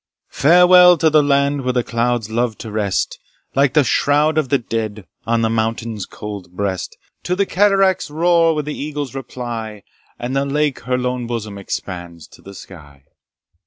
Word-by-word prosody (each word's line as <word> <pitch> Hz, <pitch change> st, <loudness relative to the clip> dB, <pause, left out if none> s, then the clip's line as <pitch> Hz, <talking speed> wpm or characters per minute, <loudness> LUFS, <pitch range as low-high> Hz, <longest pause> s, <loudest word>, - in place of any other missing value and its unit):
Farewell 180 Hz, +3 st, +6 dB
to 160 Hz, 0 st, +2 dB
the 155 Hz, 0 st, +5 dB
land 140 Hz, 0 st, +1 dB
where 125 Hz, -1 st, -1 dB
the 125 Hz, -1 st, +1 dB
clouds 115 Hz, -2 st, -1 dB
love 115 Hz, -1 st, -1 dB
to 110 Hz, -, -8 dB
rest, 105 Hz, -3 st, -1 dB, 0.3 s
Like 140 Hz, 0 st, +2 dB
the 150 Hz, -, +5 dB
shroud 150 Hz, +4 st, +2 dB
of 140 Hz, -5 st, -2 dB
the 140 Hz, -, +3 dB
dead, 110 Hz, -4 st, -4 dB, 0.2 s
on 115 Hz, 0 st, +1 dB
the -, -, +3 dB
mountain's 115 Hz, -1 st, -2 dB
cold 100 Hz, -4 st, -8 dB
breast 95 Hz, -1 st, -4 dB, 0.2 s
To 180 Hz, -, -2 dB
the 200 Hz, +1 st, +1 dB
cataract's 195 Hz, -3 st, +2 dB
roar 165 Hz, +1 st, +2 dB
where 150 Hz, -, -1 dB
the 150 Hz, +1 st, -5 dB
eagles 145 Hz, -3 st, -5 dB
reply, 115 Hz, -5 st, -6 dB, 0.3 s
And 125 Hz, +2 st, -4 dB
the 135 Hz, -, +1 dB
lake 145 Hz, 0 st, -1 dB
her 125 Hz, 0 st, 0 dB
lone 125 Hz, -1 st, -2 dB
bosom 110 Hz, -4 st, -5 dB
expands 85 Hz, -4 st, -6 dB
to -, -, -18 dB
the 100 Hz, 0 st, -12 dB
sky. 75 Hz, -8 st, -14 dB
125 Hz, 170 wpm, -19 LUFS, 110-150 Hz, 0.3 s, Farewell